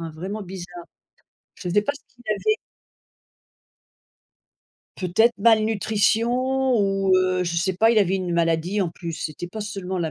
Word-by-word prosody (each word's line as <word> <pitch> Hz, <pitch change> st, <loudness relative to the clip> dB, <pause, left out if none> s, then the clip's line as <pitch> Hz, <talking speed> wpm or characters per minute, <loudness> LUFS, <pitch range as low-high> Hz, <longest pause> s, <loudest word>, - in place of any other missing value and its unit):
hein, 165 Hz, -1 st, -5 dB
vraiment 190 Hz, +7 st, -5 dB
bizarre. 175 Hz, -2 st, -9 dB, 0.7 s
Je 180 Hz, -, -6 dB
sais 205 Hz, +4 st, +3 dB
pas 250 Hz, -, -1 dB
ce 285 Hz, -, -13 dB, 0.2 s
qu'il 245 Hz, -, -20 dB
avait. 430 Hz, -, +1 dB, 2.4 s
Peut-être 200 Hz, +6 st, +2 dB
malnutrition 220 Hz, 0 st, +3 dB, 0.5 s
ou, 195 Hz, -2 st, +1 dB
heu, 185 Hz, 0 st, +1 dB
je 170 Hz, -1 st, -2 dB
sais 190 Hz, +2 st, +1 dB
pas, 225 Hz, +5 st, +4 dB
il 230 Hz, -, +4 dB
avait 195 Hz, -1 st, +2 dB
une 185 Hz, -2 st, -3 dB
maladie 170 Hz, +4 st, +1 dB
en 185 Hz, -, +1 dB
plus, 170 Hz, 0 st, -7 dB
c'était 160 Hz, +2 st, -5 dB
pas 215 Hz, +5 st, -7 dB
seulement 190 Hz, -3 st, -4 dB
la 160 Hz, -2 st, -1 dB
190 Hz, 155 wpm, -23 LUFS, 175-215 Hz, 2.4 s, pas